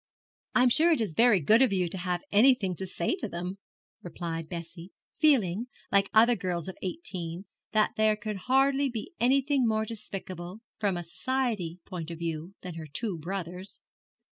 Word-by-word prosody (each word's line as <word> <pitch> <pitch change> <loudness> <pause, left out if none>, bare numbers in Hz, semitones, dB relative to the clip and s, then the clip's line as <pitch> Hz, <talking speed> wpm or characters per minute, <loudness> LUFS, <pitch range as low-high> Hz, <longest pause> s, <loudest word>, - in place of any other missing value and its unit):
'I'm 250 0 +5
sure 320 +7 +5
it 315 - +3
is 210 -8 -1
very 230 0 +5
good 215 - +5
of 260 - +4
you 185 -2 +1
to 180 - -5
have 175 -1 -2
anything 210 -4 +4
to 190 - -4
say 185 - -1
to 225 - -4
them,' 180 +3 -5 0.4
replied 165 -2 -5
Bessie, 170 0 -7 0.3
feeling, 235 - +3 0.2
like 200 0 +4
other 235 +2 +6
girls 180 -3 -3
of 190 - -6
eighteen, 185 - -2 0.3
that 215 -1 +3
there 215 0 +4
could 210 -1 -5
hardly 270 +1 +3
be 235 - -6
anything 270 +1 +3
more 220 0 +1
despicable 195 -3 -6 0.2
from 200 -4 0
a 175 - -4
Society 215 -3 -2
point 170 -4 -6
of 165 - -6
view 165 +2 -4
than 180 -2 -6
her 160 -1 -7
two 185 +4 -3
brothers.' 180 +2 -5
195 Hz, 170 wpm, -28 LUFS, 175-235 Hz, 0.4 s, other